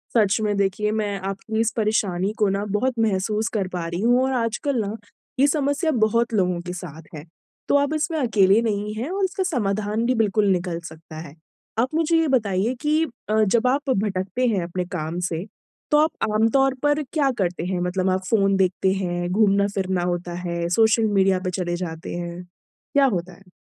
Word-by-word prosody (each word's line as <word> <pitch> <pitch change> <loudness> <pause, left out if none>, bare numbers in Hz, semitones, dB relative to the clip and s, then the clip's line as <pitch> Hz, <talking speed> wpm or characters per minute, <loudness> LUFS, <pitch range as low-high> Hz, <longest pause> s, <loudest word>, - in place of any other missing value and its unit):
सच 210 -3 +4
में। 210 -1 0
देखिए, 200 +2 0
मैं 210 -2 -1
आपकी 195 +3 -4
इस 225 0 +2
परेशानी 205 -3 0
को 210 -3 +3
ना 195 +1 -1
बहुत 250 +6 +1
महसूस 215 0 0
कर 200 -4 0
पा 175 -2 -3
रही 170 +2 -3
हूँ 245 +3 +3
और 265 - 0
आजकल 245 +3 -1
ना 205 +1 -3 0.4
ये 280 - +5
समस्या 290 +2 +1
बहुत 230 +2 0
लोगों 180 -4 +1
के 180 0 -6
साथ 165 -3 -8
है। 150 - -7 0.4
तो - - +3
आप 285 +1 +1
इसमें 315 +1 -1
अकेले 215 -5 +4
नहीं 210 -2 -2
हैं 240 +7 -3
और 390 +1 -1
इसका 380 +1 0
समाधान 215 - -1
भी 255 +1 +2
बिल्कुल 215 -2 +2
निकल 175 -2 -1
सकता 160 0 -12
है। 145 - -14 0.4
आप 255 +5 +1
मुझे 330 0 +2
ये 325 -1 +2
बताइए 215 -4 +1
कि 305 +1 +2 0.3
अ, 215 0 +3
जब 225 +4 +2
आप 275 +3 0
भटकते 200 +1 0
हैं 200 -6 +1
अपने 180 +1 -3
काम 160 +2 -3
से 165 +3 -3 0.5
तो 300 - +5
आप 310 +1 +4 0.2
आमतौर 240 +5 +3
पर 290 +1 +2
क्या 295 -4 +2
करते 180 -3 -1
हैं? 180 0 -1
मतलब 185 +1 0
आप 185 0 +1
फ़ोन 195 -3 +3
देखते 190 0 +2
हैं, 175 -2 -2
घूमना-फिरना 195 -2 +1
होता 175 0 -4
है, 170 -1 -3
सोशल 220 +4 +3
मीडिया 190 -1 +3
पे - - +1
चले 175 -1 -1
जाते 160 -1 -7
हैं। 175 0 -5 0.5
क्या 280 -1 +6
होता 185 -7 -1
है? 185 +1 -19
205 Hz, 195 wpm, -23 LUFS, 185-240 Hz, 0.5 s, क्या